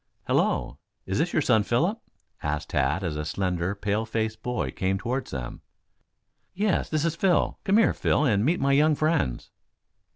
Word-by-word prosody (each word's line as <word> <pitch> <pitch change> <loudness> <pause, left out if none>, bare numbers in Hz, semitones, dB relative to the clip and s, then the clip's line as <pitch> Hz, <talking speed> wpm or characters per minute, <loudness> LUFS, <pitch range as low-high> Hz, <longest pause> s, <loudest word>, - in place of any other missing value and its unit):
"Hello, 65 - 0 0.3
is 95 - -1
this 170 +3 +1
your 155 - +1
son, 110 -5 +4
Philip?" 165 - 0 0.4
asked 75 +1 -3
Tad, 75 +7 +1
as 80 -4 -2
a 75 - -3
slender, 90 +3 -2
pale 105 +2 -1
faced 110 -1 -3
boy 120 - -2
came 95 +1 -1
toward 125 +6 -3
them. 65 -3 -6 0.9
"Yes, 205 +1 0
this 155 0 0
is 165 -1 0
Phil. 180 0 +1
Come 195 +1 +4
here, 225 - +4
Phil 150 - +1
and 105 -6 +2
meet 165 +8 +2
my 140 0 +2
young 150 +2 +4
friends." 155 - 0
110 Hz, 170 wpm, -26 LUFS, -, 0.9 s, son